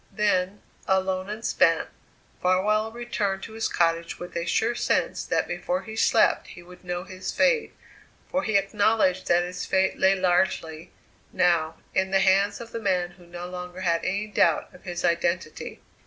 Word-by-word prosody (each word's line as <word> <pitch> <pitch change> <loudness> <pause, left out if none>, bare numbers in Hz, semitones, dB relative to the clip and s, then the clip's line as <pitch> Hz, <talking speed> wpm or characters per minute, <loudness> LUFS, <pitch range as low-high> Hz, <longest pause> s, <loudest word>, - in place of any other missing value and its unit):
Then, 200 -1 0 0.2
alone 190 0 0
and 215 +2 -6
spent, 165 -3 +3 0.5
Farwell 210 +4 +2
returned 210 -5 -2
to 220 - -8
his 225 0 -1
cottage 165 0 0
with 175 - -9
a 170 0 -2
sure 225 +7 +1
sense 240 - 0
that - - 0
before 270 +1 -2
he 220 -1 -8
slept - - +3
he 175 - -12
would 180 +1 -15
know 175 0 -3
his 185 0 -6
fate, 485 -2 +2 0.5
for 280 - 0
he 220 -6 +2
acknowledged 200 -1 +1
that 175 0 +4
his 180 +1 -5
fate 190 0 +1
lay 190 +1 +4
largely, 175 -3 0 0.4
now, 165 -2 +2 0.2
in 190 0 +1
the 195 0 +3
hands 195 +2 +3
of 235 -1 -9
the 230 - -4
man 180 -3 0
who 175 -1 -18
no 175 0 -7
longer 180 0 -7
had 170 -2 +1
any 200 +3 -1
doubt 210 - +1
of 180 - -17
his 175 -1 -3
identity. 170 -1 -1
185 Hz, 170 wpm, -25 LUFS, 175-205 Hz, 0.5 s, that